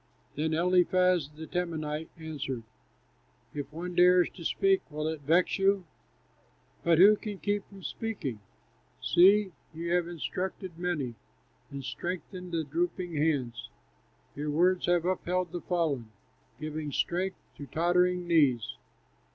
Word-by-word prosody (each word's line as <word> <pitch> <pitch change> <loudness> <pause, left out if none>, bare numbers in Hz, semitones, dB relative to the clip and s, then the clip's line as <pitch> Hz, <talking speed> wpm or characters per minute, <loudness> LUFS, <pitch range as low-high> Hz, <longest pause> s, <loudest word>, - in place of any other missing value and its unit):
Then 155 +2 0
Eliphaz, 180 -2 +3
the 155 +1 -9
Temanite, 160 -2 -3
answered: 140 -6 -5 0.9
"If 145 -1 -5
one 175 +3 -5
dares 180 0 +5
to 170 - -11
speak, 390 - +2
will 155 0 -3
it 160 -2 -3
vex 170 +7 +2
you? 195 -1 +3 1.0
But 170 -1 +4
who 200 +5 +8
can 210 -1 -6
keep 205 0 -1
from 195 -2 -13
speaking? 180 - -4 0.6
See! 195 +2 +5 0.2
you 170 +1 -3
have 175 -1 +2
instructed 180 +1 -4
many, 155 -9 -1 0.6
And 140 -1 -7
strengthened 180 +2 -5
the 165 -1 0
drooping 185 - -2
hands. 145 -6 0 0.7
Your 150 +1 -3
words 175 +5 +2
have 175 -1 +3
upheld 180 -1 -1
the 175 -1 -4
fallen, 150 -11 -1 0.5
Giving 155 -1 -4
strength 185 +6 -1 0.2
to 145 - -8
tottering 180 +3 +2
knees. 145 -9 +3
175 Hz, 125 wpm, -29 LUFS, 155-180 Hz, 1.0 s, who